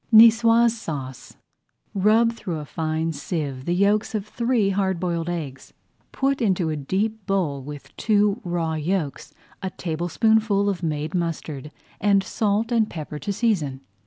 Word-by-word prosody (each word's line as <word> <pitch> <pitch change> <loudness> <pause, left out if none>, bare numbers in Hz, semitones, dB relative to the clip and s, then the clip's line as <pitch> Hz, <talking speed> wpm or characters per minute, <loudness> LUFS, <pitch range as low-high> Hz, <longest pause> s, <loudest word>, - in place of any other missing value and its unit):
NIÇOISE 230 +1 +7
SAUCE 140 - -6 0.6
Rub 220 +4 +4
through 185 -7 -5
a 150 - -6
fine 160 +1 -2
sieve 140 -3 -4
the 175 - 0
yolks 205 +3 +2
of 205 -2 -2
three 230 -2 +1
hard 190 -2 0
boiled 170 -2 -1
eggs. 145 -7 -5 0.4
Put 275 0 0
into 185 -7 +1
a - - -1
deep 200 +9 -2
bowl, 170 -8 0
with 145 +1 -10
two 210 0 +2
raw 170 -3 -1
yolks, 155 -1 -2 0.3
a 190 - -2
tablespoonful 200 +5 +1
of 190 -3 -2
made 155 -1 -2
mustard, 160 -5 -3 0.3
and 200 -1 +3
salt 215 +3 0
and 225 -2 +2
pepper 150 -2 -6
to 205 - -3
season. 185 - 0
185 Hz, 145 wpm, -24 LUFS, 155-215 Hz, 0.6 s, NIÇOISE